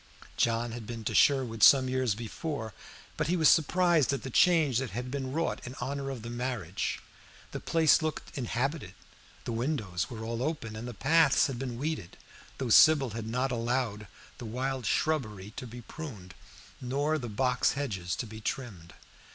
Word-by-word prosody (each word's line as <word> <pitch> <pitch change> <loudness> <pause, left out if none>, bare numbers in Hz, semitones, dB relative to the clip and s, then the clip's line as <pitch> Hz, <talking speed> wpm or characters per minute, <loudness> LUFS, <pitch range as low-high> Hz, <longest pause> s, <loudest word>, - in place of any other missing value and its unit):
John 115 0 +1
had 115 -2 -7
been 115 -2 -6
to - - -2
Sherwood 125 -6 +3
some 130 +2 +7
years 130 -4 0
before, 120 +1 -5 0.4
but 160 - 0
he 180 +3 +1
was 160 -2 +5
surprised 170 -2 +3
at 140 - -3
the 135 - -6
change 155 -6 +4
that 135 -2 -3
had 125 +5 -5
been 135 -2 -3
wrought 165 +4 -1
in 125 +1 -7
honor 135 +2 -3
of 130 -5 -6
the 115 - -6
marriage. 120 -7 -3 0.5
The - - -4
place 165 -1 +3
looked 155 -1 -4
inhabited, 125 - -2 0.5
the - - -4
windows 115 - -2
were 110 -2 -7
all 115 +1 -3
open, 135 -7 -3
and 115 +3 -6
the 120 - -7
paths 155 +4 +4
had 130 -4 -3
been 125 -3 -4
weeded, 145 - -4 0.4
though 130 -3 -3
Sybil 140 -1 +6
had 110 +1 -5
not 125 +4 -1
allowed 115 -3 -1 0.3
the 120 - -7
wild 130 +2 -3
shrubbery 110 -11 -1
to 130 - -6
be 120 +1 -9
pruned 110 - -9 0.5
nor 145 +5 0
the 120 -3 -5
box 125 +4 +1
hedges 95 - -3
to 120 - -4
be 110 0 -10
trimmed. 105 -8 -5
125 Hz, 175 wpm, -29 LUFS, 115-140 Hz, 0.5 s, some